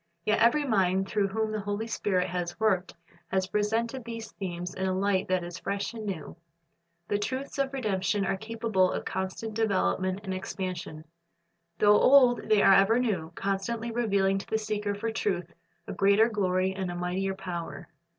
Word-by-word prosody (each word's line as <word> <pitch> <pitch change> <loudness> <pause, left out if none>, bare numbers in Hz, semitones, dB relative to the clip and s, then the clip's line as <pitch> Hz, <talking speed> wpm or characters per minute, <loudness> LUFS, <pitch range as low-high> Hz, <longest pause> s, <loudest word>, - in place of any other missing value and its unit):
Yet 215 - +2
every 285 +6 +4
mind 190 -5 +2
through 205 -1 +1
whom 220 +2 -1
the 215 - -2
Holy 205 +2 -3
Spirit 190 -5 0
has 175 0 -4
worked 190 -5 +1 0.3
has 190 +1 0
presented 225 +6 -1
these 230 -1 -7
themes 180 -3 -5
in 190 0 -2
a 185 0 0
light 195 -1 +1
that 185 -1 +1
is 175 0 -7
fresh 200 +3 -3
and 220 -2 -6
new. 175 -7 -5 0.7
The 205 - 0
truths 260 +6 -4
of 275 -1 +1
redemption 205 -5 0
are 190 - 0
capable 220 -3 0
of - - -4
constant 190 +4 -4
development 195 -3 0
and 190 -2 -3
expansion. 185 -4 -5 0.7
Though 210 0 +5
old, 255 -3 +5
they 215 -2 +5
are 195 - +7
ever 195 +4 +5
new, 195 -10 -1
constantly 220 +4 -2
revealing 200 -4 +1
to - - -9
the 220 - 0
seeker 210 -1 -2
for 225 +3 -3
truth 180 -6 -2 0.3
a - - -4
greater 200 +4 +4
glory 190 -3 0
and 190 -1 -3
a 175 - -4
mightier 185 +2 -2
power. 180 -3 -6
200 Hz, 175 wpm, -28 LUFS, 185-220 Hz, 0.7 s, are